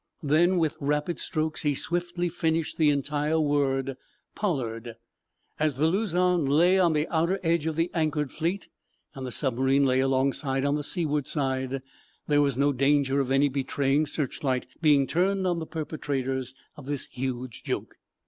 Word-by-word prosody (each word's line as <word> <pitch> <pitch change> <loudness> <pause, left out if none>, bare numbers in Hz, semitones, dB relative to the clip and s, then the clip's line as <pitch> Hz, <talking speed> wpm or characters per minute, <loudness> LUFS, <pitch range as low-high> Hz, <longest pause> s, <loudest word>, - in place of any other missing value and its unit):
Then, 170 +5 +3
with 160 -3 0
rapid 150 +4 -1
strokes, 155 -2 -2
he 145 -2 +1
swiftly 175 +3 -1
finished 165 -2 -1
the 155 -2 +5
entire 145 +2 0
word: 135 -3 0 0.4
"Pollard." 120 - -3 0.6
As 155 -3 +1
the 145 +4 +1
"Luzon" 180 -1 +2
lay 170 +7 +4
on 175 -3 +4
the 150 +1 0
outer 170 +4 +1
edge 165 -2 +1
of 160 - -1
the 165 +2 0
anchored 155 -4 0
fleet, 175 +4 -2 0.5
and 135 -3 -6
the - - -5
submarine 135 +2 +2
lay 130 -1 +2
alongside 135 +1 +1
on 140 - +2
the 150 - -2
seaward 150 -4 -1
side, 130 -2 -2 0.4
there 145 -1 +3
was 140 -3 +1
no 140 +1 +3
danger 140 +1 +2
of 135 -2 0
any 135 +2 +4
betraying 140 +2 0
searchlight 135 -3 -1 0.2
being 145 -4 +5
turned 190 +5 +1
on 175 -2 +1
the 160 - -6
perpetrators 135 -5 -3 0.2
of 140 -3 -12
this 145 -2 -3
huge 130 -2 -5
joke. - - -4
145 Hz, 160 wpm, -27 LUFS, 135-160 Hz, 0.6 s, the